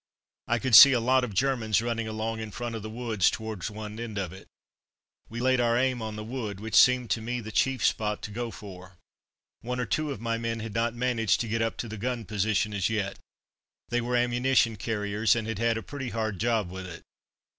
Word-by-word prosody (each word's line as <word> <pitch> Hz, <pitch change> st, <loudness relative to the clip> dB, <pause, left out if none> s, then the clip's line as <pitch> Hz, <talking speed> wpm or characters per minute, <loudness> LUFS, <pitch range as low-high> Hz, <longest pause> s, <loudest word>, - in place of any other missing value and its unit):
I 120 Hz, -, +2 dB
could 130 Hz, +1 st, -2 dB
see 135 Hz, +6 st, +11 dB
a 125 Hz, -, +2 dB
lot 130 Hz, +2 st, +3 dB
of 110 Hz, -5 st, -4 dB
Germans 115 Hz, -4 st, +1 dB
running 115 Hz, -1 st, -2 dB
along 110 Hz, +1 st, -3 dB
in 110 Hz, -1 st, -5 dB
front 120 Hz, +3 st, -5 dB
of 110 Hz, -, -5 dB
the 110 Hz, -, -6 dB
wood 115 Hz, -2 st, -5 dB
towards 110 Hz, +1 st, 0 dB
one 105 Hz, +1 st, -8 dB
end 115 Hz, -3 st, -5 dB
of 95 Hz, -3 st, -3 dB
it. 95 Hz, -, -13 dB, 0.8 s
We 115 Hz, -, -6 dB
laid 130 Hz, 0 st, +2 dB
our 120 Hz, 0 st, +2 dB
aim 130 Hz, -1 st, +1 dB
on 110 Hz, -1 st, -5 dB
the 105 Hz, -, -6 dB
wood, 110 Hz, -4 st, -5 dB
which 110 Hz, 0 st, -7 dB
seemed 125 Hz, +1 st, +5 dB
to 115 Hz, -, +1 dB
me 120 Hz, +2 st, -3 dB
the 110 Hz, -1 st, -7 dB
chief 130 Hz, +2 st, +1 dB
spot 105 Hz, -1 st, 0 dB
to 105 Hz, -, -6 dB
go 120 Hz, +2 st, -4 dB
for. 95 Hz, -4 st, -11 dB, 0.6 s
One 125 Hz, +1 st, -4 dB
or 125 Hz, -, 0 dB
two 155 Hz, +6 st, -1 dB
of 140 Hz, -, -5 dB
my 115 Hz, 0 st, -2 dB
men 115 Hz, 0 st, -2 dB
had 110 Hz, -1 st, -6 dB
not 115 Hz, +1 st, 0 dB
managed 120 Hz, -3 st, +1 dB
to 115 Hz, -, -3 dB
get 115 Hz, +1 st, -1 dB
up 115 Hz, -1 st, -1 dB
to 120 Hz, -, -4 dB
the 110 Hz, 0 st, -7 dB
gun 120 Hz, +1 st, -3 dB
position 105 Hz, +1 st, 0 dB
as 100 Hz, -1 st, 0 dB
yet. 105 Hz, -3 st, -2 dB, 0.7 s
They 120 Hz, 0 st, 0 dB
were 120 Hz, +1 st, -1 dB
ammunition 120 Hz, -1 st, +2 dB
carriers, 105 Hz, 0 st, 0 dB
and 115 Hz, -1 st, -3 dB
had 115 Hz, -2 st, -3 dB
had 115 Hz, 0 st, +1 dB
a 115 Hz, -, -5 dB
pretty 135 Hz, -3 st, -6 dB
hard 110 Hz, -3 st, -3 dB
job 110 Hz, -5 st, 0 dB
with 95 Hz, 0 st, -7 dB
it. 85 Hz, -2 st, -10 dB
115 Hz, 230 wpm, -27 LUFS, 105-120 Hz, 0.8 s, see